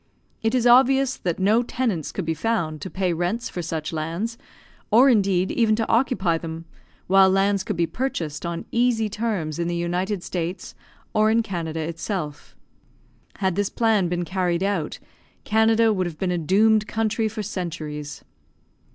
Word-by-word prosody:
It 225 +2 +1
is 245 -2 +1
obvious 260 +2 +5
that 175 -3 -2
no 210 +5 +3
tenants 235 - -2
could 190 - -4
be 160 - 0
found 160 -5 -2
to 190 - -5
pay 185 -2 -1
rents 180 +8 -2
for 180 - -5
such 160 -1 -4
lands, 165 +9 -3 0.5
or 245 +6 +6
indeed 195 -5 +2
even 220 -2 +2
to 225 0 -1
occupy 195 -8 +1
them, 165 0 -7 0.4
while 190 0 +5
lands 195 +1 +2
could 210 - -3
be 170 - +2
purchased 165 - -3
on 170 -1 -4
easy 235 -2 +2
terms 200 -8 -2
in 170 - 0
the 175 - -1
United 180 +3 -2
States, 175 +1 -4 0.4
or 215 0 +3
in 230 +1 +3
Canada 165 -6 -4
itself. 165 -1 -5 0.8
Had 190 -2 0
this 205 0 0
plan 220 -5 +2
been 175 0 -2
carried 180 -1 -1
out, 195 -6 -1 0.5
Canada 220 +1 +3
would 185 -3 -1
have 165 -3 -7
been 185 +1 -1
a 175 - 0
doomed 215 +6 +3
country 220 0 0
for 215 0 -5
centuries. 155 -7 -5
190 Hz, 165 wpm, -23 LUFS, 170-220 Hz, 0.8 s, or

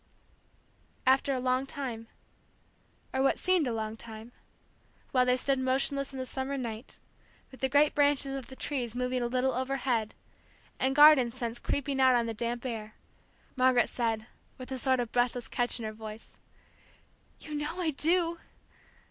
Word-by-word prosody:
And 260 - +7
after 270 +1 0
a 260 - 0
long 255 +1 0
time, 245 -6 -5 1.1
or 265 - +1
what 270 - +3
seemed 365 -6 +2
a - - -1
long 220 -1 -3
time, 225 +1 -10 0.8
while 250 -1 +3
they 250 0 +3
stood 270 +1 +1
motionless 270 +2 0
in 270 - -8
the 260 - -3
summer 265 +2 -3
night, 230 -1 -6 0.5
with 260 - -13
the 265 - 0
great 290 +2 +4
branches 285 -1 +3
of 265 -3 -6
the 265 - -10
trees 250 -5 -3
moving 250 0 -1
a 240 - 0
little 255 +2 0
overhead, 255 -4 -1 0.6
and 265 +1 +1
garden 295 -4 +8
scents 240 -1 -4
creeping 275 -1 -1
out 260 -1 +6
on 235 -1 +2
the 225 - -3
damp 235 +3 -2
air, 220 -3 -5 0.6
Margaret 255 -2 +3
said, 225 -3 -1 0.3
with 255 +1 -9
a 260 - -2
sort 260 +1 +2
of 240 -2 -2
breathless 245 -1 0
catch 245 0 0
in 230 - -6
her 215 - -4
voice: 215 0 -10 1.0
"You 305 - -9
know 295 +4 -3
I 335 -3 0
do!" 335 +3 +2
255 Hz, 170 wpm, -30 LUFS, 235-275 Hz, 1.1 s, garden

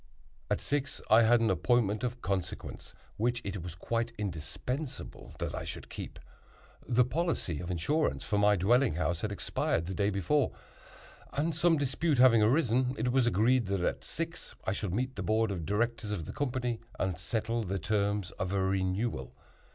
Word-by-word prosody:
At - - 0
six 140 -1 -1
I 110 +2 +8
had 115 +1 +5
an 115 - +3
appointment 110 -3 +2
of 125 0 -3
consequence, 95 -2 -4 0.2
which 120 +2 +1
it 100 -2 -3
was 85 0 -6
quite 115 +6 -1
indispensable 105 - -5
that - - -3
I - - -3
should - - -7
keep. - - -7 0.7
The 120 0 +4
policy 140 - -1
of 85 - -5
insurance 145 - 0
for 105 - 0
my 105 0 +5
dwelling 115 - +3
house 85 +1 -1
had 105 - -2
expired 85 -4 -1
the 95 - -4
day 100 +1 +1
before; 105 - +1 0.8
and, 155 +3 0
some 170 0 +4
dispute 145 +2 +1
having 120 -3 +7
arisen, 125 +1 +3
it 120 +3 0
was 130 -1 +3
agreed 120 +2 +3
that, 100 -1 0
at - - -1
six, - - -5
I 95 - +1
should 100 -2 -3
meet 130 +7 -1
the - - -4
board 110 0 +2
of 85 -5 -4
directors 110 +1 0
of 95 -7 -3
the - - -7
company 125 -4 -1 0.2
and 95 -2 0
settle 110 +6 -1
the 100 0 -2
terms 100 -2 0
of 95 0 -1
a 100 - +2
renewal. 95 - -1
110 Hz, 175 wpm, -31 LUFS, 95-125 Hz, 0.8 s, I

